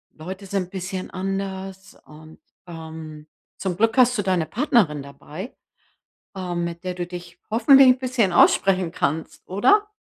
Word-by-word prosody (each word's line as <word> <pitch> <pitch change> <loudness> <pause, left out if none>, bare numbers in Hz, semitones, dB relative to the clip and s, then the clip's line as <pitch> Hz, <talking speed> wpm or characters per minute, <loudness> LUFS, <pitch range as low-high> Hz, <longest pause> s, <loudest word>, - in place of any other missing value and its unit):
Leute 190 +5 -8
sind 190 -2 -3
bisschen 185 0 -5
anders 195 0 -5
und, 155 +1 -15 0.3
ähm, 160 -2 -9 0.3
zum 185 -2 -3
Glück 225 +3 +2
hast 250 -2 +5
du - - +1
deine 185 -4 +1
Partnerin 200 - +1
dabei, 155 - -9 0.8
ähm, 175 -2 -3
mit 170 +1 -5
der 180 -1 -4
du 175 -1 -3
dich 175 -1 -10
hoffentlich 270 +3 +7
'n 255 0 +5
bisschen 245 -8 0
aussprechen 185 -1 +4
kannst, 155 0 -3
oder? 405 - +3
185 Hz, 145 wpm, -23 LUFS, 170-200 Hz, 0.8 s, hoffentlich